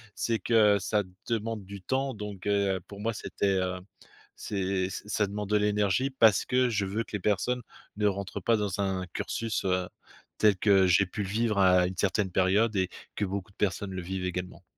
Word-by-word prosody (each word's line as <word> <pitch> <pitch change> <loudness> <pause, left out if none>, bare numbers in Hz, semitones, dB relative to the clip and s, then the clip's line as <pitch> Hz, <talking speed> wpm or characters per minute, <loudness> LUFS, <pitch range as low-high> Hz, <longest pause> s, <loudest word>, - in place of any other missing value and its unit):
C'est 115 -1 0
que 105 -3 +4
ça 105 +2 0 0.3
demande 115 -2 -2
du 100 -1 -9
temps 130 +3 -1
donc, 105 -2 -7
heu, 100 -2 +2
pour 100 - -10
moi 115 +1 -1
c'était, 100 - -3
heu, 90 0 -1 0.6
c'est 95 -2 -2
ç - - -6
ça 105 -1 +1
demande 105 0 -5
de 105 - +4
l'énergie 105 +4 +1
parce 110 -7 +4
que 125 0 +2
je 105 -4 0
veux 105 +4 -2
que - - -17
les 105 - -1
personnes 105 +6 0 0.4
ne 105 0 +2
rentrent 100 -1 -3
pas 115 -1 +3
dans 100 -2 -2
un 95 -1 -1
cursus, 115 -1 -2
heu, 90 -1 +1 0.5
tel 105 -3 +4
que 95 -2 +4
j'ai 90 +3 +4
pu 105 +3 -5
le 95 - -5
vivre 110 -1 0
à 90 -1 +5
une 95 - -6
certaine 95 0 0
période 100 +5 +2
et 95 -2 +1 0.3
que 105 - 0
beaucoup 100 0 -5
de - - -30
personnes 100 0 -1
le 95 - -4
vivent 95 +1 -4
également. 90 +1 -5
100 Hz, 205 wpm, -28 LUFS, 95-105 Hz, 0.6 s, à